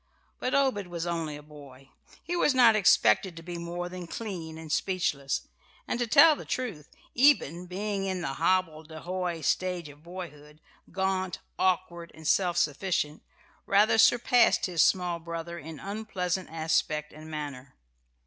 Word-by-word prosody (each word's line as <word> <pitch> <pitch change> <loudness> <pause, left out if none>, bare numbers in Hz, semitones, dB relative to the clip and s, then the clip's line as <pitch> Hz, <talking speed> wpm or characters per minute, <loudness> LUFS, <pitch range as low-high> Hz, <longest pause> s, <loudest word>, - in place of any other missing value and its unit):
But 255 - -1
Obed 260 -9 +1
was 170 -1 -4
only 165 -3 -3
a 145 - -11
boy. 140 -3 -14 0.3
He 350 - -3
was 295 -5 +2
not 235 -4 +6
expected 190 -3 +3
to 165 - -9
be 175 0 -6
more 175 +1 -4
than 180 -1 -8
clean 170 -6 -6
and 160 -1 -8
speechless; 150 -7 -1 0.4
and, 240 - -2
to 240 - 0
tell 315 +7 +7
the - - -9
truth, 215 - -4 0.3
Eben, 210 - +3
being 195 +2 -3
in 185 -2 -2
the 135 -6 -3
hobbledehoy 170 0 -1
stage 180 0 -1
of 145 +1 -15
boyhood 155 -4 -10 0.3
gaunt, 190 0 -1 0.2
awkward, 175 -2 0
and 160 -1 -8
self 175 -2 +2
sufficient 150 -1 0 0.5
rather 210 +3 +4
surpassed 240 +2 +4
his 175 -3 +1
small 180 -2 +2
brother 170 +1 -6
in 160 -1 -9
unpleasant 195 -2 -3
aspect 155 -1 -1
and 155 +1 -11
manner. 145 -4 -7
175 Hz, 150 wpm, -28 LUFS, 160-190 Hz, 0.5 s, tell